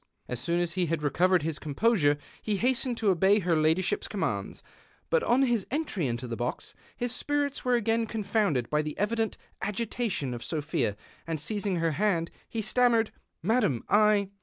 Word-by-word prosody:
As 125 Hz, -, -3 dB
soon 170 Hz, 0 st, 0 dB
as 175 Hz, -1 st, -1 dB
he 180 Hz, -2 st, 0 dB
had 160 Hz, -1 st, -1 dB
recovered 175 Hz, +3 st, +3 dB
his 160 Hz, -1 st, -2 dB
composure 150 Hz, -1 st, +2 dB, 0.2 s
he 210 Hz, -2 st, -1 dB
hastened 250 Hz, +1 st, 0 dB
to 215 Hz, -3 st, +3 dB
obey 190 Hz, +3 st, +4 dB
her 175 Hz, -5 st, +1 dB
ladyships 160 Hz, -, +1 dB
commands, -, -, -3 dB, 0.5 s
but 485 Hz, -, +4 dB
on 255 Hz, -, +3 dB
his 235 Hz, -6 st, +1 dB
entry 250 Hz, -, -1 dB
into 120 Hz, +1 st, -3 dB
the 115 Hz, -, -3 dB
box 120 Hz, +2 st, -4 dB, 0.2 s
his 245 Hz, 0 st, -1 dB
spirits 285 Hz, +1 st, -1 dB
were 250 Hz, -1 st, +3 dB
again 230 Hz, 0 st, +1 dB
confoimded 200 Hz, -, 0 dB
by 150 Hz, 0 st, +3 dB
the 150 Hz, 0 st, -5 dB
evident 220 Hz, +1 st, 0 dB, 0.2 s
agitation 210 Hz, -, -2 dB
of 120 Hz, -, -6 dB
Sophia, 135 Hz, -9 st, -1 dB, 0.3 s
and, 165 Hz, -1 st, -2 dB
seizing 200 Hz, +4 st, -2 dB
her 165 Hz, -1 st, +1 dB
hand, 170 Hz, -1 st, 0 dB, 0.2 s
he 225 Hz, -1 st, -2 dB
stam 245 Hz, +3 st, +3 dB
mered, 225 Hz, -1 st, +2 dB, 0.2 s
" -, -, -51 dB
Madam, 205 Hz, -, +2 dB
I 210 Hz, -2 st, +4 dB
195 Hz, 180 wpm, -28 LUFS, 155-230 Hz, 0.5 s, obey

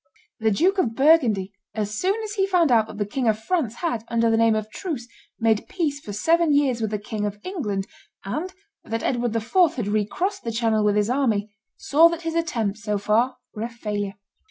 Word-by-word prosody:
The 220 Hz, 0 st, +2 dB
Duke 365 Hz, -, +2 dB
of 230 Hz, -10 st, 0 dB
Burgundy, 245 Hz, -10 st, +3 dB, 0.2 s
as 210 Hz, -1 st, -2 dB
soon 380 Hz, -, 0 dB
as 425 Hz, -1 st, -5 dB
he 390 Hz, -2 st, +1 dB
found 350 Hz, -7 st, +3 dB
out 225 Hz, -2 st, +4 dB
that 210 Hz, -, -10 dB
the 205 Hz, -, -1 dB
King 240 Hz, +4 st, -2 dB
of 215 Hz, -1 st, +3 dB
France 240 Hz, -1 st, -1 dB
had, 240 Hz, -8 st, -2 dB
under 230 Hz, 0 st, +2 dB
the -, -, +3 dB
name 225 Hz, -1 st, +4 dB
of 215 Hz, 0 st, -3 dB
truce, 285 Hz, -, -5 dB, 0.3 s
made 225 Hz, -2 st, +2 dB
peace 310 Hz, -6 st, -1 dB
for 215 Hz, -, -8 dB
seven 325 Hz, +8 st, +2 dB
years 265 Hz, -5 st, +2 dB
with 220 Hz, -, 0 dB
the 210 Hz, -, -1 dB
King 210 Hz, +1 st, -5 dB
of 205 Hz, 0 st, -2 dB
England, 210 Hz, -, -3 dB, 0.4 s
and 310 Hz, -, -3 dB, 0.3 s
that 225 Hz, +1 st, -3 dB
Edward 240 Hz, -3 st, 0 dB
IV. 225 Hz, +1 st, -4 dB, 0.2 s
had 235 Hz, -6 st, -3 dB
recrossed 280 Hz, -, -1 dB
the 230 Hz, -, -2 dB
Channel 225 Hz, -2 st, +1 dB
with 205 Hz, -1 st, +2 dB
his 210 Hz, +2 st, +1 dB
army, 215 Hz, -6 st, 0 dB, 0.2 s
saw 315 Hz, +4 st, +5 dB
that 335 Hz, 0 st, -5 dB
his 330 Hz, 0 st, -2 dB
attempts, 230 Hz, -11 st, -1 dB
so 210 Hz, 0 st, -1 dB
far, 215 Hz, +6 st, +1 dB, 0.2 s
were 215 Hz, -, -7 dB
a 230 Hz, -, -2 dB
failure. 210 Hz, -4 st, -4 dB
230 Hz, 210 wpm, -24 LUFS, 210-315 Hz, 0.4 s, saw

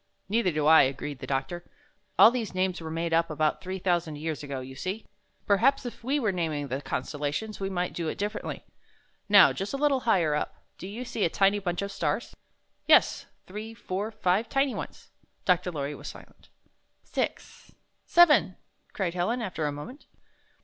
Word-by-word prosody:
"Neither 220 Hz, -2 st, +2 dB
do 150 Hz, -1 st, -1 dB
I," 160 Hz, +1 st, +8 dB
agreed 135 Hz, +1 st, -2 dB
the -, -, -7 dB
doctor. 170 Hz, +6 st, -2 dB, 0.5 s
"All 225 Hz, -, +9 dB
these 230 Hz, -6 st, -3 dB
names 185 Hz, -1 st, 0 dB
were 160 Hz, -, -6 dB
made 165 Hz, +1 st, -2 dB
up 165 Hz, 0 st, +3 dB
about 155 Hz, 0 st, 0 dB
three 190 Hz, +1 st, -4 dB
thou 175 Hz, -2 st, +2 dB
sand 160 Hz, -3 st, -8 dB
years 155 Hz, 0 st, -4 dB
ago, 140 Hz, -2 st, -5 dB
you 130 Hz, +1 st, -8 dB
see. 185 Hz, +10 st, -5 dB, 0.4 s
Perhaps 255 Hz, +7 st, +3 dB
if 240 Hz, -, -7 dB
we 275 Hz, +5 st, +1 dB
wxre 215 Hz, -7 st, 0 dB
naming 155 Hz, -5 st, -2 dB
the 135 Hz, +2 st, -2 dB
constellations, 145 Hz, +11 st, -3 dB
we 195 Hz, 0 st, -2 dB
might 180 Hz, -2 st, -2 dB
do 170 Hz, -2 st, -3 dB
it -, -, -3 dB
dif 205 Hz, +1 st, -2 dB
ferently. -, -, -6 dB, 0.7 s
Xow, 205 Hz, -2 st, +8 dB
just 195 Hz, +7 st, -4 dB
a -, -, -2 dB
little 280 Hz, -2 st, +2 dB
higher 180 Hz, -11 st, +2 dB
up, 150 Hz, -, -2 dB, 0.2 s
do 185 Hz, -, -7 dB
you 225 Hz, +6 st, -6 dB
see 225 Hz, -3 st, -2 dB
a -, -, +3 dB
tiny 200 Hz, +4 st, +3 dB
bunch 180 Hz, -1 st, -2 dB
of 200 Hz, -, -4 dB
stars?" 170 Hz, +3 st, -2 dB, 0.5 s
"Yes, -, -, +4 dB, 0.2 s
three, 215 Hz, +4 st, -7 dB
four, 205 Hz, -1 st, -3 dB
five 200 Hz, 0 st, 0 dB
tiny 275 Hz, -1 st, +1 dB
ones." -, -, -8 dB, 0.3 s
Dr. 180 Hz, 0 st, +2 dB
Lorry 145 Hz, -2 st, -3 dB
was -, -, -9 dB
silent. -, -, -12 dB, 0.5 s
"Six -, -, -4 dB, 0.2 s
— -, -, -47 dB
seven!" 300 Hz, -, +5 dB, 0.4 s
cried 185 Hz, -4 st, -1 dB
Helen, 185 Hz, +8 st, 0 dB
after 175 Hz, -9 st, -2 dB
a -, -, -1 dB
moment. 150 Hz, -, -9 dB
185 Hz, 190 wpm, -28 LUFS, 155-215 Hz, 0.7 s, All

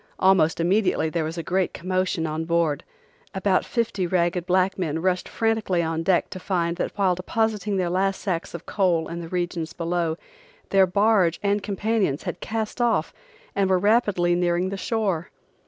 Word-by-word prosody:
Almost 185 Hz, -4 st, +3 dB
immediately 180 Hz, -2 st, +2 dB
there 165 Hz, -1 st, 0 dB
was 160 Hz, +2 st, -4 dB
a 165 Hz, -, -3 dB
great 185 Hz, 0 st, 0 dB
commotion 185 Hz, -2 st, -1 dB
on 160 Hz, +1 st, -3 dB
board. 170 Hz, -2 st, +1 dB, 0.5 s
About 190 Hz, -1 st, +2 dB
fifty 225 Hz, -6 st, -1 dB
ragged 175 Hz, 0 st, 0 dB
black 185 Hz, +1 st, +2 dB
men 160 Hz, -3 st, -1 dB
rushed 180 Hz, +1 st, 0 dB
frantically 220 Hz, -6 st, 0 dB
on 165 Hz, 0 st, -1 dB
deck 175 Hz, +1 st, +1 dB
to 185 Hz, -, -6 dB
find 170 Hz, -2 st, -1 dB
that -, -, -2 dB
while 190 Hz, -2 st, +3 dB
depositing 210 Hz, +2 st, -1 dB
their 185 Hz, -2 st, 0 dB
last 190 Hz, +2 st, 0 dB
sacks 175 Hz, -4 st, -3 dB
of 170 Hz, -, -8 dB
coal 180 Hz, -5 st, +1 dB
in 170 Hz, +1 st, -5 dB
the 165 Hz, -, -8 dB
regions 175 Hz, -2 st, -3 dB
below, 170 Hz, -1 st, -1 dB, 0.5 s
their 195 Hz, -1 st, +5 dB
barge 200 Hz, -3 st, +3 dB
and 205 Hz, +1 st, +1 dB
companions 200 Hz, -6 st, -1 dB
had -, -, -4 dB
cast 220 Hz, +2 st, -3 dB
off 240 Hz, -1 st, +1 dB, 0.4 s
and 195 Hz, -1 st, +2 dB
were 185 Hz, -, +4 dB
rapidly 205 Hz, -3 st, +2 dB
nearing 175 Hz, +1 st, +1 dB
the 195 Hz, -, -4 dB
shore. 195 Hz, -5 st, -1 dB
185 Hz, 170 wpm, -24 LUFS, 170-195 Hz, 0.5 s, their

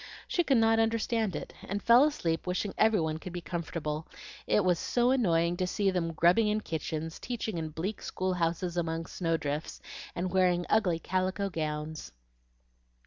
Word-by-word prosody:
She 350 Hz, -, +1 dB
could 275 Hz, -5 st, +3 dB
not 225 Hz, 0 st, +4 dB
understand 225 Hz, -3 st, +1 dB
it, -, -, -6 dB
and 200 Hz, +2 st, -3 dB
fell 235 Hz, +3 st, +7 dB
asleep 170 Hz, -, -1 dB
wishing 185 Hz, +2 st, -1 dB
every 220 Hz, -2 st, +4 dB
one 160 Hz, -1 st, -1 dB
could 180 Hz, +1 st, -8 dB
be 175 Hz, -, -3 dB
comfortable, 160 Hz, -2 st, -4 dB, 0.4 s
it 205 Hz, -, +3 dB
was 180 Hz, -2 st, +3 dB
so 245 Hz, +1 st, +2 dB
annoying 175 Hz, -9 st, +2 dB
to 185 Hz, -, 0 dB
see 195 Hz, +1 st, +1 dB
them 170 Hz, -3 st, -1 dB
grubbing 175 Hz, +7 st, +4 dB
in 210 Hz, +1 st, +1 dB
kitchens, 160 Hz, -1 st, -4 dB
teaching 220 Hz, -7 st, -3 dB
in 160 Hz, -1 st, -3 dB
bleak 175 Hz, +7 st, -4 dB
school 185 Hz, 0 st, -2 dB
houses 175 Hz, 0 st, -1 dB
among 165 Hz, -1 st, -1 dB
snow 165 Hz, -2 st, -1 dB
drifts, 145 Hz, 0 st, -4 dB, 0.4 s
and 180 Hz, +1 st, -2 dB
wearing 180 Hz, -2 st, +3 dB
ugly 190 Hz, -6 st, +3 dB
calico 185 Hz, +3 st, -1 dB
gowns. 155 Hz, -, -4 dB
180 Hz, 170 wpm, -30 LUFS, 165-210 Hz, 0.4 s, fell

